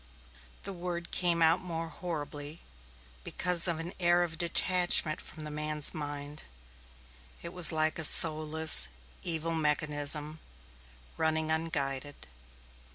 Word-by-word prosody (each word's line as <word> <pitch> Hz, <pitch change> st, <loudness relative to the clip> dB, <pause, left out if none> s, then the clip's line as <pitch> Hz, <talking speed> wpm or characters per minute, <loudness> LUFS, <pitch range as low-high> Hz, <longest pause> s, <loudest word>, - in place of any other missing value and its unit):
The 195 Hz, -, -7 dB
word 175 Hz, -1 st, -8 dB
came 170 Hz, -2 st, -1 dB, 0.2 s
more 165 Hz, -3 st, -8 dB
horribly 150 Hz, -3 st, -9 dB, 0.6 s
because 180 Hz, -, +1 dB
of 170 Hz, -2 st, -3 dB
an 165 Hz, +3 st, -8 dB
air 175 Hz, 0 st, +1 dB
of 165 Hz, -1 st, -8 dB
detachment 175 Hz, -2 st, +6 dB
from 155 Hz, -, -13 dB
the 150 Hz, -, -8 dB
man's 150 Hz, 0 st, -4 dB
mind. 145 Hz, -1 st, -8 dB, 1.0 s
It 170 Hz, -, -10 dB
was 180 Hz, -2 st, +5 dB
like 155 Hz, 0 st, -3 dB
a -, -, -2 dB
soulless, 155 Hz, -, +4 dB, 0.3 s
evil 165 Hz, 0 st, -5 dB
mechanism, 150 Hz, 0 st, -3 dB, 0.8 s
running 160 Hz, 0 st, -2 dB
unguided. 145 Hz, -3 st, -5 dB
160 Hz, 110 wpm, -28 LUFS, 150-170 Hz, 1.0 s, detachment